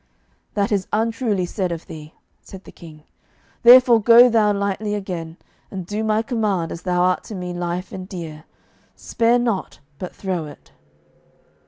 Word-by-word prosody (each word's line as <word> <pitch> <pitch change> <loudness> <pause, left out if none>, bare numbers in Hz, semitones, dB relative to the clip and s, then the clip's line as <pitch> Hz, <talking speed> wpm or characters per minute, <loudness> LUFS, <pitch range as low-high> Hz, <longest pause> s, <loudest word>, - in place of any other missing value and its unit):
"That 205 +2 0
is 200 -2 0
untruly 220 -3 0
said 180 0 -3
of 170 -1 -6
thee," 155 0 -11 0.3
said 190 0 -12
the - - -13
King; 155 -3 -14 0.6
"therefore 245 -1 +7
go 235 +3 +7
thou 220 -3 +3
lightly 200 +1 -2
again, 175 -5 -6 0.3
and 185 -3 -6
do 210 +4 -3
my 215 0 +1
command 210 -8 -1
as 170 - -7
thou 180 -1 0
art 180 0 +1
to 215 - -8
me 180 -1 -5
lief 175 +1 -4
and 185 0 -8
dear; 160 -4 -8 0.5
spare 235 +1 +1
not, 235 -5 -2 0.2
but 180 - -7
throw 180 -5 -3
it." 145 - -15
195 Hz, 160 wpm, -21 LUFS, 175-220 Hz, 0.6 s, therefore